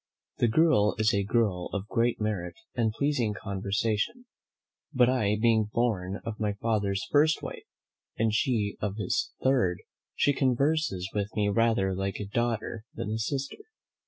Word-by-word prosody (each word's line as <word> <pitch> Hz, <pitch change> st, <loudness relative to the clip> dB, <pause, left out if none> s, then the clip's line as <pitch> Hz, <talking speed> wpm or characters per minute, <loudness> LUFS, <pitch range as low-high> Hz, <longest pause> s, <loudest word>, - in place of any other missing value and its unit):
The 120 Hz, -, +4 dB
girl 110 Hz, -5 st, +3 dB
is 110 Hz, 0 st, +2 dB
a 100 Hz, 0 st, +2 dB
girl 100 Hz, -4 st, 0 dB
of 100 Hz, 0 st, -3 dB
great 115 Hz, +1 st, +1 dB
merit 105 Hz, -5 st, -2 dB, 0.2 s
and 115 Hz, -3 st, +1 dB
pleasing 120 Hz, -4 st, 0 dB
conversation: 105 Hz, -, -2 dB, 0.7 s
but 125 Hz, -4 st, +4 dB
I 105 Hz, -5 st, +1 dB
being 110 Hz, -2 st, +3 dB
born 100 Hz, -5 st, -1 dB
of 115 Hz, -2 st, -5 dB
my 105 Hz, -2 st, 0 dB
father's 100 Hz, 0 st, -1 dB
first 155 Hz, +1 st, +3 dB
wife, -, -, -7 dB, 0.5 s
and 110 Hz, -1 st, +1 dB
she 110 Hz, -3 st, 0 dB
of 100 Hz, -2 st, -2 dB
his 105 Hz, -4 st, -1 dB
third, 120 Hz, -10 st, +2 dB, 0.4 s
she 145 Hz, -, +3 dB
converses 135 Hz, -, +1 dB
with 100 Hz, -1 st, -1 dB
me 105 Hz, -1 st, +2 dB
rather 110 Hz, -3 st, +2 dB
like 95 Hz, +1 st, -2 dB
a 105 Hz, -, -3 dB
daughter 115 Hz, +1 st, -2 dB
than 105 Hz, -, -4 dB
a 110 Hz, -, -2 dB
sister. 135 Hz, +5 st, -3 dB
110 Hz, 155 wpm, -28 LUFS, 100-120 Hz, 0.7 s, The